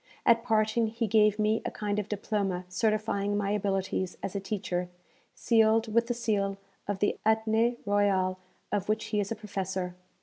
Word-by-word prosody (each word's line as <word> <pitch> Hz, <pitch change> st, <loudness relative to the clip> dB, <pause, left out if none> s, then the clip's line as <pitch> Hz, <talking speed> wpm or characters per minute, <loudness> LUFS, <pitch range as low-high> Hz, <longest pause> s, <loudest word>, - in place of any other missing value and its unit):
At 230 Hz, 0 st, +5 dB
parting, 220 Hz, -1 st, +2 dB
he 230 Hz, +2 st, -2 dB
gave 215 Hz, 0 st, +4 dB
me 215 Hz, +1 st, +1 dB
a -, -, -2 dB
kind 210 Hz, 0 st, -2 dB
of 210 Hz, 0 st, -4 dB
diploma 200 Hz, -3 st, -2 dB
certifying 205 Hz, +1 st, 0 dB
my 200 Hz, -1 st, 0 dB
abilities 195 Hz, -2 st, -1 dB
as 195 Hz, -, -4 dB
a -, -, 0 dB
teacher 185 Hz, -3 st, -3 dB, 0.5 s
sealed 225 Hz, -1 st, +3 dB
with 235 Hz, +1 st, +3 dB
the 240 Hz, -, -1 dB
seal 200 Hz, -4 st, 0 dB, 0.3 s
of 205 Hz, -1 st, -1 dB
the 205 Hz, +2 st, 0 dB
Athenée 220 Hz, +2 st, +2 dB
Royal 195 Hz, -2 st, +2 dB, 0.3 s
of 205 Hz, 0 st, -1 dB
which 215 Hz, -, 0 dB
he 210 Hz, -, +3 dB
is 200 Hz, 0 st, -2 dB
a -, -, 0 dB
professor.... 190 Hz, -4 st, -4 dB
210 Hz, 170 wpm, -29 LUFS, 195-220 Hz, 0.5 s, At